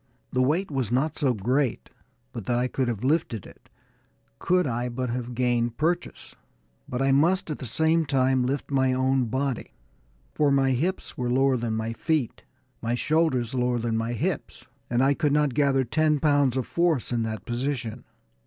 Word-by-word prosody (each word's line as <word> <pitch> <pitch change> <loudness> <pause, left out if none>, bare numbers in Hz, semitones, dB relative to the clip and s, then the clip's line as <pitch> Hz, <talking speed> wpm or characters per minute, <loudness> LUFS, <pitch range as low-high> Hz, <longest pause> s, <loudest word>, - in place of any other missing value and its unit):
The 130 - +2
weight 155 +8 +1
was 130 -6 -2
not 140 +5 0
so 135 -5 +2
great 125 +5 -1 0.4
but - - -7
that 120 -1 +1
I 125 +1 +1
could 130 0 -1
have 115 -2 -3
lifted 130 - 0
it, - - -16 0.7
could 180 0 +2
I 120 0 -2
but 125 0 -3
have 120 0 -4
gained 120 -1 0
purchase. 175 +3 -2 0.6
But 125 +2 -1
I 135 - +3
must 165 +5 +2
at 150 - -4
the 130 - -6
same 160 +6 +1
time 130 -1 +2
lift 135 +3 -2
my 130 -1 +2
own 130 0 +2
body, 130 +2 -3 0.6
for 150 -1 +2
my 135 -1 +3
hips 165 +8 -2
were 125 -1 -1
lower 135 +1 +3
than 115 -2 -2
my 110 +1 -2
feet, 150 0 -1 0.4
my 115 +1 -1
shoulders 135 -4 +1
lower 125 -1 +1
than 115 -1 -1
my 115 +1 -1
hips; 115 - -3 0.2
and 120 +1 +2
I 140 +1 +4
could 145 0 0
not 150 -3 +2
gather 140 -2 +2
ten 150 +4 +1
pounds 145 -3 +2
of 130 - -1
force 170 -8 0
in 120 -1 0
that 110 -3 -4
position. 120 -1 -3
130 Hz, 180 wpm, -26 LUFS, 120-145 Hz, 0.7 s, I